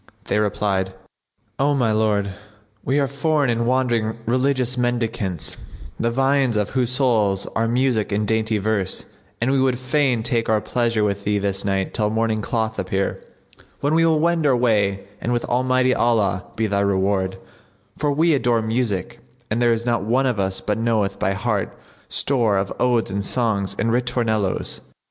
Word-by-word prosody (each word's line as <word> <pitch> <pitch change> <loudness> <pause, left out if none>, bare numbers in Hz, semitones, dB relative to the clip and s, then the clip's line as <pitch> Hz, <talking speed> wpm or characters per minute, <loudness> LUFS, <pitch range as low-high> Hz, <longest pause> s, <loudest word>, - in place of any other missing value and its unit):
They 105 - 0
replied, 100 -2 -1 0.6
"O 145 +1 +2
my 120 -5 +2
lord, 105 -2 +1 0.5
we 135 +3 +1
are 140 - +2
foreign 140 -1 +1
and 115 0 0
wandering 120 -4 +1
religious 130 +1 +1
mendicants, 115 -7 -2 0.4
the 115 - +1
viands 135 -1 +2
of 105 -1 -1
whose 125 -2 0
souls 115 -7 +2
are 115 +1 +1
music 120 -3 +1
and 105 +1 0
dainty 110 0 +1
verse, 100 -2 -2 0.3
and 120 +3 +1
we 135 -1 +2
would 130 -2 +2
fain 130 -2 +1
take 115 -1 0
our 110 -1 +3
pleasure 115 0 0
with 100 -1 -1
thee 105 0 +1
this 100 -1 -2
night 95 -1 -1
till 105 -2 +1
morning 110 0 0
cloth 110 0 -2
appear, 95 +1 -2 0.6
when 145 +2 +1
we 165 +1 +4
will 160 -2 +3
wend 165 -1 +2
our 130 -3 +3
way, 105 -5 +1 0.2
and 120 - -2
with 120 - -1
Almighty 130 +1 +2
Allah 105 -7 +1
be 110 - 0
thy 100 -2 0
reward; 95 -1 0 0.6
for 145 - 0
we 160 +3 +3
adore 120 -5 +1
music 110 -4 -2 0.3
and 115 +3 0
there 120 -1 +4
is 115 0 -1
not 120 -4 +1
one 120 +7 +1
of 125 -5 0
us 95 -1 0
but 105 +1 -2
knoweth 110 -4 0
by 95 - +1
heart 105 +1 -2 0.3
store 115 -7 +1
of 95 0 -1
odes 120 -5 +1
and 100 +1 -2
songs 100 -4 0
and 115 - 0
ritornellos." 115 -5 -1
115 Hz, 170 wpm, -22 LUFS, 100-125 Hz, 0.6 s, we